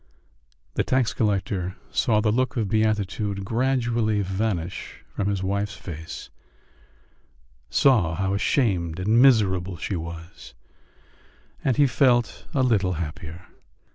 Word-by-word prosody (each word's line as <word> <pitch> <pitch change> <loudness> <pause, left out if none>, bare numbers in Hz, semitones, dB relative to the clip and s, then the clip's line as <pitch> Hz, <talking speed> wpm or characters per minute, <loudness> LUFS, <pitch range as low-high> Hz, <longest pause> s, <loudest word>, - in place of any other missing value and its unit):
The - - +1
tax 130 -3 +1
collector 95 -3 -1 0.2
saw 110 -2 +2
the 105 -1 +2
look 130 +2 0
of 110 -3 0
beatitude 105 -2 0
gradually 120 -3 +1
vanish 95 -2 -3
from 100 - -3
his 100 -2 -1
wife's 100 +2 -1
face, 80 -2 -8 1.4
saw 105 - +3
how 95 +2 -1
ashamed 95 - +1
and 110 +6 +3
miserable 95 -8 +3
she 100 - -3
was 85 0 -8 1.1
and 130 -4 +1
he 145 - +6
felt 125 -3 +2
a 135 - +3
little 100 -7 +2
happier. 85 +1 -6
100 Hz, 115 wpm, -24 LUFS, 90-115 Hz, 1.4 s, he